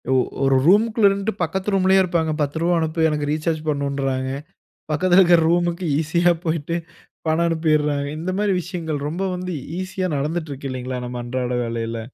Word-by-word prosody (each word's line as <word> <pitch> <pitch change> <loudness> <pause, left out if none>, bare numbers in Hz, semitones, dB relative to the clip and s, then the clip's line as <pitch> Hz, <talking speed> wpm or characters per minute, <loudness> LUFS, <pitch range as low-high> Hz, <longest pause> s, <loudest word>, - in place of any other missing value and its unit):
ஒ - - +5 0.3
ஒரு 135 0 +4
ரூமுக்குள்ள 215 +3 +5
இருந்துட்டு 200 0 -2
பக்கத்து 190 +4 -2
ரூம்லயே 190 0 +4
இருப்பாங்க. 165 -3 0
10 145 +2 -1
ருவா 175 +1 +2
அனுப்புயா, 160 0 +1
எனக்கு 150 -1 -2
ரீசார்ஜ் 155 +1 -1
பண்ணணுன்றாங்க. 140 -2 -1 0.6
பக்கத்தில 175 +4 +4
இருக்குற 175 -2 +5
ரூமுக்கு 175 +1 +1
ஈஸியா 170 +2 +2
போய்ட்டு, 165 +1 -1 0.5
பணம் 160 +2 +2
அனுப்பிறாங்க. 155 -3 +1
இந்த 180 +3 -2
மாரி 210 -1 +2
விஷயங்கள், 165 -4 -4
ரொம்ப 180 +5 -3
வந்து 180 0 -4 0.3
ஈஸியா 185 0 -2
நடந்துட்டுருக்கு 145 -2 -3
இல்லைங்களா? 130 0 -4
நம்ம 120 0 -5
அன்றாட 125 0 -2
வேலைல? 115 0 -3
160 Hz, 155 wpm, -22 LUFS, 140-180 Hz, 0.6 s, ஒ